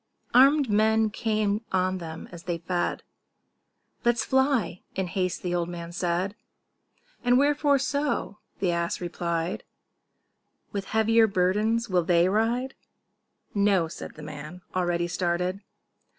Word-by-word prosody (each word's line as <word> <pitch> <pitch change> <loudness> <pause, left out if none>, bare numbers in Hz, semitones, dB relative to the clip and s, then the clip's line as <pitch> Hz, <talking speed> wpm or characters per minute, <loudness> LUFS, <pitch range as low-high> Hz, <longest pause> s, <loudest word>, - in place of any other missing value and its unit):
Arm'd 275 +3 +6
men 220 +1 +3
came 215 -1 0
on 185 0 +1
them 160 -1 -7
as 170 -2 -9
he 175 -2 -1
fed: 175 +1 -2 1.0
"Let's 240 -1 +2
fly," 265 -10 +1
in 190 - 0
haste 185 +1 -2
the 175 -1 -1
old 175 -1 0
man 170 -1 -6
said. 180 +2 -1 0.9
"And 245 0 +4
wherefore 285 +1 +3
so?" 285 -6 -1 0.2
the 185 -3 +1
ass 170 0 -1
replied; 170 0 -2 1.1
"With 200 -1 -3
heavier 220 +1 +4
burdens 210 +5 +1
will 180 -3 +2
they 170 +1 +4
ride?" 235 +6 0 0.8
"No," 200 -4 +3
said 160 - -9
the 150 - -10
man, 150 +4 -8
already 175 -1 +1
started. 180 +2 -1
190 Hz, 125 wpm, -26 LUFS, 175-225 Hz, 1.1 s, Arm'd